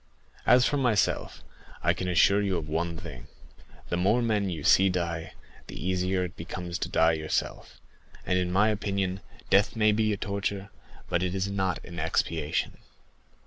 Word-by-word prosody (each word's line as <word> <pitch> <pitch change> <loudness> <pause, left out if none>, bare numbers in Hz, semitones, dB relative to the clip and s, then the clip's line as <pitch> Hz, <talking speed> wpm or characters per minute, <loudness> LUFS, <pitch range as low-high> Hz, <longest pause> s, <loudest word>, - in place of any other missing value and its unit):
As 125 +1 +6
for 145 - +1
myself, 120 -6 0 0.4
I - - +3
can 90 - -4
assure 100 +3 +4
you 95 -3 0
of 80 -2 -4
one 85 +2 -2
thing,—the 75 +2 -10
more 105 +7 +2
men 105 -4 +1
you 80 -5 -5
see 95 +5 +5
die, 85 -2 -3 0.3
the - - -9
easier 90 +2 0
it 90 - -6
becomes 85 +1 -5
to - - -3
die 80 0 +4
yourself; 80 -1 -3 0.5
and 90 - +1
in 90 -1 -1
my 100 +4 +4
opinion, 100 -3 -1 0.3
death 100 +4 +4
may 110 -1 +4
be 110 0 +1
a 105 - -1
torture, 100 0 -3 0.4
but 85 -1 0
it 90 0 -1
is 95 +1 -1
not 95 -2 -1
an 85 -1 -8
expiation." 80 -1 -1
95 Hz, 165 wpm, -27 LUFS, 85-100 Hz, 0.5 s, As